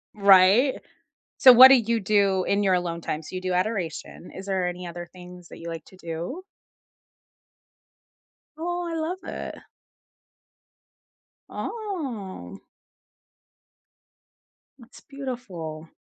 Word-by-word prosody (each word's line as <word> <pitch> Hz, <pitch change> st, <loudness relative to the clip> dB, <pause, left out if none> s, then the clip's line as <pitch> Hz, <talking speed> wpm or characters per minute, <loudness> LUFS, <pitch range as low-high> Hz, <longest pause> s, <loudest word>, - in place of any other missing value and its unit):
Right? 200 Hz, +6 st, +5 dB, 0.6 s
So 255 Hz, -, +9 dB
what 255 Hz, +2 st, +11 dB
do 270 Hz, -, +7 dB
you 230 Hz, -1 st, 0 dB
do 195 Hz, -2 st, +2 dB
in 200 Hz, +1 st, +1 dB
your 190 Hz, -2 st, +2 dB
alone 170 Hz, -1 st, -3 dB
time? 155 Hz, 0 st, -4 dB
So 170 Hz, -, -10 dB
you 185 Hz, -, -4 dB
do 185 Hz, -1 st, -2 dB
adoration. 180 Hz, -3 st, -3 dB
Is 190 Hz, -, -9 dB
there 190 Hz, -2 st, -1 dB
any 180 Hz, 0 st, -6 dB
other 175 Hz, 0 st, -8 dB
things 180 Hz, -1 st, -13 dB
that -, -, -11 dB
you 170 Hz, -, -9 dB
like 165 Hz, -2 st, -6 dB
to 185 Hz, -, -18 dB
do? 170 Hz, -, -6 dB, 2.1 s
Oh, 350 Hz, +1 st, -3 dB
I 335 Hz, -, -4 dB
love 330 Hz, +3 st, -3 dB
it. -, -, -7 dB, 1.9 s
Oh. 265 Hz, -, -6 dB, 2.2 s
That's 240 Hz, +1 st, -16 dB
beautiful. 195 Hz, -, -7 dB
190 Hz, 115 wpm, -25 LUFS, 175-255 Hz, 2.2 s, what